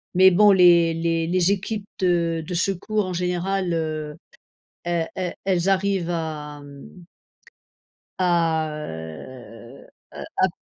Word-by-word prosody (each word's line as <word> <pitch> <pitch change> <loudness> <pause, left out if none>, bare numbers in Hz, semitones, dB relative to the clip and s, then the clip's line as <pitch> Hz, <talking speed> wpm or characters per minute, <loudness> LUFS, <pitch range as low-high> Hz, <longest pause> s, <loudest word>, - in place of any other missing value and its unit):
Mais 190 +1 +7
bon 205 +3 +6
les 175 -3 +5
les 165 0 -1
les 180 +2 +2
équipes 205 +1 -3
de 170 -3 +1
de 180 - -6
secours 195 +3 -1
en 185 - -4
général, 180 +1 -1
heu, 155 -2 -3 0.7
elles 170 -1 -1
elles 180 -2 -3
elles 185 -1 +1
arrivent, 195 -2 +1
hem 150 0 -7 1.1
à 165 -3 +1
heu 115 - -10 0.3
heu, - - -8 0.2
à - - +4
170 Hz, 120 wpm, -23 LUFS, 160-185 Hz, 1.1 s, Mais